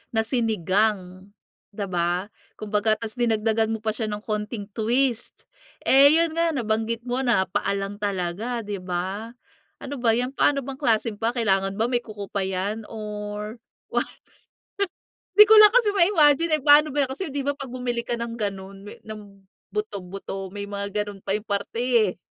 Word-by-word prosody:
na 220 - +3
sinigang, 205 - 0 0.5
'di 205 - -3
ba. 175 +3 -1 0.2
Kumbaga 215 +1 +1
tapos 225 +2 -7
dinagdagan 225 -1 +2
mo 225 -1 -3
pa 220 - +1
siya 220 +1 -2
ng 210 0 -5
konting 210 -1 -4
twist. 240 +2 -1 0.4
Eh, 275 +1 +7
yun 330 0 +3
nga, 335 0 +2
nabanggit 225 -1 -1
mo 250 +1 -1
na 240 -7 +3
paa 205 +3 -2
lang 195 +1 -5
talaga, 205 +4 -2
di 205 -1 -4
ba. 185 +5 -4 0.5
Ano 280 -2 -5
ba 235 - +3
yan? 250 +2 -1
Paano 275 -1 +2
bang 275 - -5
klaseng 225 -5 0
paa? 225 - +2
Kailangan 195 -4 +1
ba 225 - +2
may 245 - +2
kuko 210 -3 -8
pa 200 - 0
yan, 195 +4 -2
or 210 0 -6 0.3
what? - - +1 1.3
Di 425 - +11
ko 440 - +9
lang 425 -1 +9
kasi 475 -4 +4
ma-imagine 325 -4 +4
eh. - - -13
Paano 295 +1 +6
ba 290 - +2
yan? - - -25
Kasi 335 -2 -5
di 285 - -1
ba, 285 - +1
'pag 270 -4 -7
bumili 245 -2 -2
ka - - -2
ng 235 0 -4
ganun, 195 -2 -5
may 205 - -10
ng 205 -2 -10 0.3
buto-buto, 195 -2 -5
may 200 -1 -5
mga 200 +1 -3
ganun 200 -2 -9
pa - - -2
yung 210 +1 -2
parte 200 +3 -3 0.3
eh. - - -29
220 Hz, 180 wpm, -24 LUFS, 200-245 Hz, 1.3 s, Di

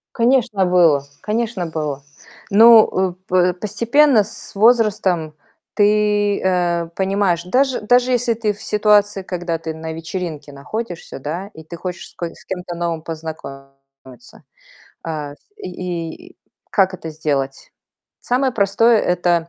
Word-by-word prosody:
Конечно, 230 -5 +2
было. 170 -6 +4 0.2
Конечно, 215 -3 -2
было. 150 -4 -4 0.5
Ну, 225 +2 +7 0.2
э, - - -13
п 180 0 +3
постепенно 235 - +3
с 215 0 -12
возрастом 200 -8 +2 0.4
ты, 205 -1 +2
э, 175 -2 0
понимаешь, 190 -3 0
даже 260 +4 +1
даже 245 +3 +3
если 245 -1 +1
ты 220 -2 -1
в 205 - -15
ситуации, 210 -1 +2
когда 175 -2 -3
ты 160 0 -5
на 160 0 -6
вечеринке 165 -2 -6
находишься, 175 +5 -6
да, 165 +8 -5
и 160 - -12
ты 170 +2 -9
хочешь 180 -1 -6
с - - -24
ко 170 -1 -5
с - - -17
кем-то 180 -2 -5
новым 170 -1 -2
познакомиться. 135 - -10 0.6
Э, 150 -3 -4 0.2
и - - -16
и 175 - -6
и - - -41 0.3
как 190 -2 +3
это 165 - -8
сделать? 140 -3 -3 0.5
Самое 255 +1 0
простое- 220 +3 +3
это 175 -1 +1
180 Hz, 135 wpm, -19 LUFS, 160-215 Hz, 0.6 s, Ну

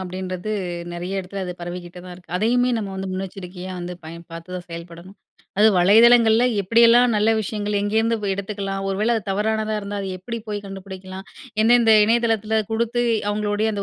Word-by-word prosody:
அப்பிடின்றது 185 +2 -5 0.4
நெறைய 180 +3 -3
இடத்துல 190 +1 -6
அது 180 - -4
பரவிக்கிட்டு 175 0 -7
தான் 180 -1 -9
இருக்கு. 175 -1 -11
அதையுமே 245 +5 +2
நம்ம 205 -3 -4
வந்து 190 0 -4
முன்னெச்சரிக்கையா 185 -1 -6
வந்து 175 +1 -5
பயன் 170 +2 -9
பார்த்து 170 +2 -8
தான் 180 - -9
செயல்படணும். 170 +3 -10 0.4
அது 215 - +6
வலைதளங்கள்ல 225 +5 +6 0.2
எப்படியெல்லாம் 235 +4 +5
நல்ல 210 +2 +3
விஷயங்கள் 210 -1 -2
எங்கேருந்து 220 +3 +1 0.2
எடுத்துக்கலாம், 195 -1 -4
ஒரு 195 - -1
வேள 230 +3 +2
அது 220 - -1
தவறானதா 215 +2 0
இருந்தா 205 0 -5
அது 195 - -4
எப்பிடி 230 +6 -6
போய் 205 -1 -4
கண்டுபிடிக்கலாம், 190 0 -9 0.4
எந்தெந்த 235 0 +5
இணையதளத்துல 220 -1 +1
குடுத்து 235 +2 0 0.3
அவுங்களுடைய 210 +1 0
அந்த 200 -1 -3
200 Hz, 160 wpm, -22 LUFS, 185-220 Hz, 0.4 s, அது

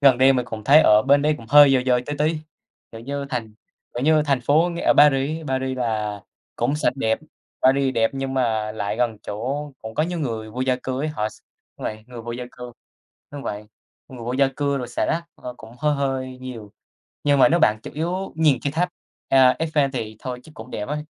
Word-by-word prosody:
gần 135 -4 +5
đây 135 +1 +6
mình 125 -2 0
cũng 110 -2 -7
thấy 145 +7 +7
ở 105 -7 +5
bên 140 +3 +4
đấy 150 +1 +2
cũng 115 - -12
hơi 145 -1 +8
dơ 130 - +4
dơ 125 -1 +3
tí 145 - -3
tí. 155 +2 +1 0.5
Kiểu 115 - -9
như, 140 +3 -4
thành 115 -5 -4 0.4
kiểu 120 - -2
như, 155 0 +4
thành 140 -3 +2
phố 155 +8 +3
ở - - +5
Paris 145 +1 +4
á, 160 - -10
Paris 130 0 -1
là 105 -4 -2 0.4
cũng 125 +5 0
sạch 150 - 0
đẹp, 110 -4 0 0.4
Paris 135 0 +3
đẹp 115 0 +2
nhưng 135 0 -3
mà 110 -4 0
lại 105 -1 -3
gần 120 -2 0
chỗ 135 +8 -4
cũng 110 0 -7
có 155 - +1
nhiều 175 +2 -2
người 115 -7 -4
vô 125 +4 -6
gia 130 -1 +1
cư 130 0 -3
ấy, 155 - -1
họ 110 -9 -2
x - - -16 0.4
đúng - - -8
vậy, 110 0 -5
người 125 -1 -9
vô 120 - -5
gia 125 +1 -5
cư, 125 -1 -9 0.6
đúng 145 -1 -7
vậy, 105 -3 -5 0.4
người 130 - -11
vô 120 - -2
gia 135 +1 +3
cư 140 -1 0
rồi 125 -2 -5
xả - - -1
rác, 170 +1 -1
ờ, 125 0 -8
cũng 115 0 -13
hơi 150 +2 +1
hơi 130 -2 -2
nhiều, 115 -5 -8 0.5
nhưng 145 -1 +3
mà 135 - +7
nếu 170 +2 +2
bạn 105 0 +3
chủ - - -8
yếu 175 +5 -3
nhìn 155 -5 +3
cái 140 - -1
tháp, 175 +3 +1 0.4
à, 130 -1 +5
Eiffel 155 -4 +1
thì 110 -4 -5
thôi 125 0 -6
chắc 155 - -15
cũng 110 +3 -10
đẹp 105 - -5
á, 150 - -2
130 Hz, 235 wpm, -22 LUFS, 115-145 Hz, 0.6 s, hơi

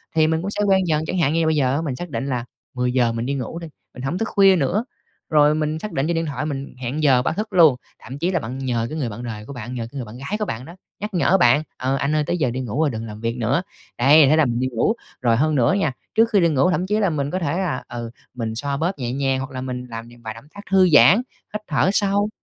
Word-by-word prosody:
thì 155 -1 +4
mình 160 0 0
cũng 195 +3 -3
sẽ 210 - -2
quen 190 -1 +4
dần, 155 -1 +1
chẳng 185 - -2
hạn 155 -4 +2
như 165 - +1
là - - +1
bây 160 0 +2
giờ 135 -3 +2
á, 150 - 0
mình 145 -6 -3
xác 175 +6 -7
định 120 -2 -3
là 125 -3 -2 0.3
10:00 125 -1 +1
mình 115 +1 -3
đi 140 - -1
ngủ 140 +4 -4
đi, 170 - -7 0.3
mình 125 - -9
hổng 140 +7 -2
thức 225 - -1
khuya 195 -1 +5
nữa, 180 - 0 0.4
rồi 150 -1 +4
mình 155 0 -1
xác 210 +5 -6
định 135 +3 -1
trên 170 - 0
điện 165 0 0
thoại 145 -1 -3
mình 140 -3 -5
hẹn 130 +5 -3
giờ 130 -4 +5
báo 125 - -1
thức 215 +3 -4
luôn, 165 -7 +6 0.2
thậm 130 +5 -9
chí 170 +5 0
là 180 - +1
bạn 125 -1 -6
nhờ 125 -4 -1
cái 155 - -5
người 135 -6 -2
bạn 110 +3 -7
đời 110 -3 -6
của 140 - -8
bạn, 120 -1 -7
nhờ 115 -2 -4
cái 140 - -9
người 130 - -4
bạn 110 +2 -11
gái 140 +11 -4
của 210 - 0
bạn 120 - -5
đó, 170 - -11 0.2
nhắc 210 0 -5
nhở 180 +1 +3
bạn: 145 -2 +4
"Ờ, 130 +1 0
anh 140 +2 0
ơi, 155 - +2
tới 175 - 0
giờ 140 -7 +1
đi 125 - -4
ngủ 125 +1 -4
rồi 155 - +3
đừng 115 -3 -5
làm 105 -1 -8
việc 115 +1 -2
nữa." 125 +7 +1 0.4
Đấy, 140 +4 +6
thế 155 - +5
là 155 -1 +4
mình 120 -2 -1
đi 130 - 0
ngủ. 120 - +1 0.3
Rồi 120 -2 +3
hơn 155 +4 +2
nữa 120 -4 +3
nha, 195 -8 +1 0.2
trước 225 +1 +4
khi 205 - +6
đi 170 -2 +4
ngủ 145 +3 +3
thậm 180 +1 -1
chí 210 +2 +1
là 200 -3 +2
mình 145 -3 -2
có 185 - -1
thể 165 -1 -1
là, 180 -9 -2
ừ, 120 -1 -6 0.2
mình 115 -3 -4
xoa 140 +3 -2
bóp 165 +5 0
nhẹ 120 -2 -2
nhàng 135 -1 0
hoặc 135 +1 -5
là 130 -1 -5
mình 125 -1 -5
làm 115 0 -7
những 120 0 -16
vài 110 -1 -5
động 115 +4 -14
tác 200 - -8
thư 190 -2 +5
giãn, 165 +5 +8 0.4
hít 210 - -3
thở 165 +3 +2
sâu, 205 +1 +2
140 Hz, 305 wpm, -22 LUFS, 125-170 Hz, 0.4 s, giãn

